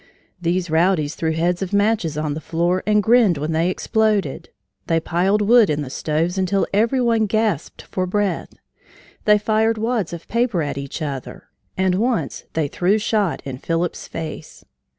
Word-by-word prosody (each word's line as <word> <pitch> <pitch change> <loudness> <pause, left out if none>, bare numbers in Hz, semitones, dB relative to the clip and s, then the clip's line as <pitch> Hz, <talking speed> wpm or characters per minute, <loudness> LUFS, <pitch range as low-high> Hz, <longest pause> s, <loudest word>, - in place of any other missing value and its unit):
These 175 0 -1
rowdies 160 -2 +2
threw 160 -1 -1
heads 175 +3 0
of 195 +1 -4
matches 205 -7 +1
on 150 -1 -1
the 155 - -5
floor 175 +3 0
and 210 -1 +3
grinned 220 -7 +4
when 150 +3 -2
they 165 +2 +1
exploded; 210 - 0 0.4
they 165 - +2
piled 190 +6 +1
wood 230 0 +5
in 150 -1 0
the 130 - -8
stoves 165 +6 -1
until 190 +1 +1
every 230 +6 +2
one 230 -3 +2
gasped 215 -6 -1
for 185 -1 -3
breath; 200 -2 -1 0.7
they 210 -1 +6
fired 220 +1 +1
wads 225 -4 -1
of 170 -1 -8
paper 235 -7 0
at 140 -1 -3
each 140 +3 -5
other; 140 -4 -6 0.3
and 190 -1 +2
once 230 +5 -1
they 160 -2 0
threw 180 +8 +1
shot 210 -3 0
in 130 -2 -6
Phillips's 165 +3 -2
face. 155 -1 -7
185 Hz, 170 wpm, -21 LUFS, 160-215 Hz, 0.7 s, they